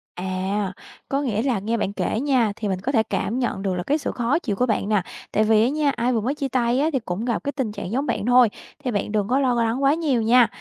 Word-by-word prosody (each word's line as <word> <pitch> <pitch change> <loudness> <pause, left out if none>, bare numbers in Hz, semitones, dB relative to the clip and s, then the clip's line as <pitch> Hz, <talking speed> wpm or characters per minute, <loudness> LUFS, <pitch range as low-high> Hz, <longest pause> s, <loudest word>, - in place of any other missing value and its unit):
À, 190 +2 -2 0.4
có 275 +1 0
nghĩa 225 -6 -1
là 245 -5 0
nghe 225 +4 -1
bạn 200 -2 -2
kể 220 - -1
nha, 255 -5 +2
thì 215 -1 -4
mình 190 -2 -1
có 260 - -1
thể 225 -5 +3
cảm 235 +3 -2
nhận 235 -6 -1
được 195 -1 -1
là 180 - -3
cái 290 - +1
sự 310 - -3
khó 245 +5 0
chịu 225 - -2
của 250 - +1
bạn 215 -3 -1
nè. 210 -3 +3 0.3
Tại 215 - +2
vì 215 0 +4
á 240 - +3
nha, 295 0 +1
ai 245 +2 0
vừa 225 - +1
mới 260 +7 -1
chia 280 -2 -2
tay 245 -1 +1
á, 305 +3 +2
thì 265 - +2
cũng 215 -1 -4
gặp 235 -3 -1
cái 285 - -1
tình 265 -7 -2
trạng 200 - -6
giống 270 +5 0
bạn 210 - -2
thôi, 245 -1 +6 0.3
thì 250 - -1
bạn 205 -1 -2
đừng 205 -2 0
có 255 +4 +2
lo 260 -3 +2
lắng 230 +4 -1
quá 275 +2 +5
nhiều 295 -8 +1
nha. 235 +2 +5
235 Hz, 290 wpm, -23 LUFS, 210-265 Hz, 0.4 s, thôi